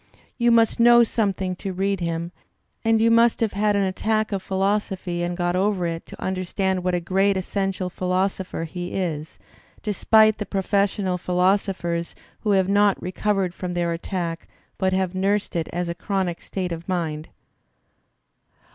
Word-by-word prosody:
You 240 0 +4
must 230 -1 +4
know 240 0 +7
something 195 -5 -1
to 190 0 -4
read 195 +1 0
him 170 0 -3 0.5
and 225 -1 +3
you 230 +1 +4
must 230 0 +4
have 225 -3 0
had 205 +1 +1
an 200 - +2
attack 215 +3 0
of 195 -2 -1
philosophy 190 -2 -1
and 175 0 -2
got 175 0 0
over 190 -1 +1
it 165 -1 -4
to - - -11
understand 185 0 -1
what 180 0 +1
a - - +1
great 190 +3 +1
essential 190 0 -2
philosopher 185 0 -1
he 175 +2 -6
is, 160 -5 -3 0.5
despite 215 +1 +4
the 210 - -4
professional 195 -1 0
philosophers 180 -2 0 0.2
who 215 - -3
have 190 -1 +3
not 205 0 +3
recovered 190 -1 -1
from 180 -1 -5
theii^'attack 170 0 -2 0.4
but 190 -1 +2
have 185 -1 0
nursed 195 +2 0
it 165 -2 -1
as 175 0 -2
a 170 - -2
chronic 185 -2 -2
state 185 -2 -4
of 170 +2 -6
mind. 160 -4 -2
190 Hz, 155 wpm, -23 LUFS, 175-200 Hz, 0.5 s, know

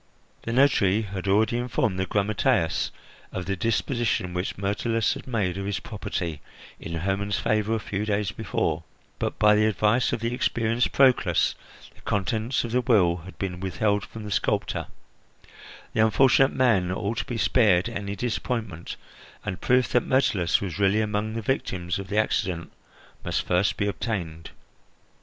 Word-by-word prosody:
The 115 - -4
notary 115 -6 +3
had 95 -2 -5
already 110 +4 +3
informed 115 -5 -1
the 95 - -1
grammateus 100 -5 +1 0.4
of 90 - -4
the 100 +2 -1
disposition 115 -2 0
which 90 +1 -3
Myrtilus 105 +3 0
had - - -9
made 100 -7 -1
of 100 - -4
his 100 -3 -1
property 85 -7 -4 0.4
in 85 - -6
Hermon's 95 +4 -1
favour 110 +1 +1
a - - -1
few 105 -1 -3
days 105 -2 0
before, 85 -6 -2 0.4
but, - - -2
by 105 0 +5
the 105 +1 +4
advice 110 +3 +2
of - - -1
the 115 +1 -2
experienced 120 -1 0
Proclus, 125 - +3 0.4
the - - -21
contents 110 +5 -1
of 120 - -5
the 125 +2 +2
will 100 -9 +3
had 90 +2 -12
been 90 -2 -4
withheld 95 +3 0
from 115 - -9
the 105 - -6
sculptor; - - -1 1.1
the - - -2
unfortunate 135 +4 +4
man 110 -9 +3
ought 100 +4 -2
to - - -2
be 120 - -4
spared 105 -7 +3
any 100 0 -4
disappointment, 110 -5 -3 0.5
and 90 - -4
proof 125 0 +3
that 125 - +3
Myrtilus 100 -10 +2
was 95 -1 -4
really 100 +2 +3
among 105 0 -1
the 115 - -3
victims 95 -8 -2
of 100 - -6
the 105 +2 -3
accident 90 -5 0 0.5
must - - -1
first 90 +3 +1
be 105 - 0
obtained. 90 -6 -3
105 Hz, 160 wpm, -25 LUFS, 95-115 Hz, 1.1 s, by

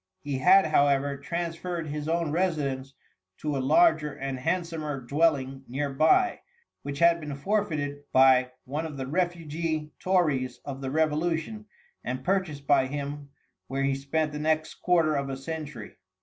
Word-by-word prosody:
He 140 -2 -2
had, 190 +6 +6
however, 140 -2 +2
transferred 170 +3 -4
his 150 0 -4
own 165 -2 0
residence 145 -6 -1 0.4
to 150 -2 -2
a - - 0
larger 150 - +4
and 135 -1 -5
handsomer 160 -2 -2
dwelling 135 0 0
near 135 +3 -3
by, 350 - +3 0.4
which 140 0 -5
had 170 +2 +5
been 150 -2 -5
forfeited 145 -5 -2
by 130 -1 +5
one 150 +5 -3
of 150 -3 -8
the 130 - -3
refugee 160 -1 -2
tories 150 -10 +1
of 135 -1 -6
the 135 - -3
revolution 160 +7 -1 0.4
and 130 +1 -4
purchased 170 -5 -1
by 135 -2 +4
him, 145 +1 -5 0.4
where 135 +1 -2
he 140 0 +2
spent 150 +3 -1
the 150 - -5
next 155 +1 0
quarter 165 -4 +3
of 140 -1 -1
a 135 - -4
century. 145 -5 -7
150 Hz, 150 wpm, -27 LUFS, 135-165 Hz, 0.4 s, had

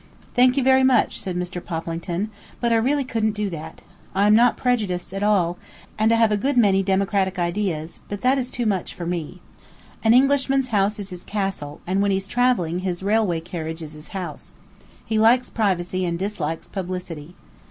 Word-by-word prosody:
"Thank 250 +2 +4
you 275 - +3
very 265 0 +5
much," 260 -1 +3
said 185 -2 -4
Mr. 180 0 -4
Poplington, 170 +4 -3 0.3
"but 235 -1 +1
I - - +4
really 275 +5 +1
couldn't 225 -4 0
do 210 -2 -2
that. 160 -2 -8 0.3
I 200 +1 +3
am 210 - +5
not 235 +3 +5
prejudiced 210 -8 -1
at 195 - -3
all, 185 -4 +2 0.4
and 220 +1 +2
I - - +5
have 225 -1 +3
a 210 - +2
good 265 +5 0
many 200 -5 +5
democratic 195 0 +1
ideas, 170 -3 -2
but 205 -1 -5
that 260 +2 +3
is 250 -1 -3
too 245 -2 -3
much 195 -5 -1
for 175 - -6
me. 175 +1 -4 0.6
An 225 +1 +5
Englishman's 270 0 +3
house 205 -1 +1
is 200 -2 -6
his 180 -1 -8
castle, 195 -8 -4
and 190 +2 0
when 200 - +2
he's 195 0 0
travelling 215 -8 +1
his 185 -1 -3
railway 200 -5 +1
carriage 160 -1 -5
is 155 -1 -9
his 150 +1 -10
house. 190 -2 -7 0.5
He 220 -1 0
likes 240 +3 +4
privacy 185 -4 0
and 170 -1 -1
dislikes 170 -5 -3
publicity." 180 -4 -6
195 Hz, 190 wpm, -23 LUFS, 175-225 Hz, 0.6 s, very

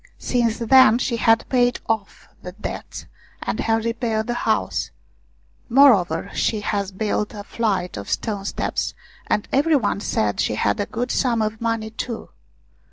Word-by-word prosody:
Since 235 -3 0
then 240 -1 +6
she 240 -1 -1
had 225 +1 +3
paid 245 -2 +2
off 220 -3 -3
the 180 - -8
debts, 210 - -7 0.4
and - - -3
had 225 0 +1
repaired 230 -2 -1
the 240 - -2 0.2
house; 220 - 0 0.8
moreover, 220 - +4
she 215 -2 0
had 200 -2 -2
built 210 0 -1
a 205 - -7
flight 200 - -2
of 100 - -7
stone 205 -3 -2
steps, - - -2 0.3
and 210 - 0
every 300 +4 +3
one 215 -6 +1
said 105 - -1
she 110 - +1
had 105 -1 0
a 205 - -1
good 245 +2 -3
sum 235 -4 +1
of 215 +1 -3
money 225 -1 -1
too. 225 +1 -5
220 Hz, 160 wpm, -22 LUFS, 205-235 Hz, 0.8 s, then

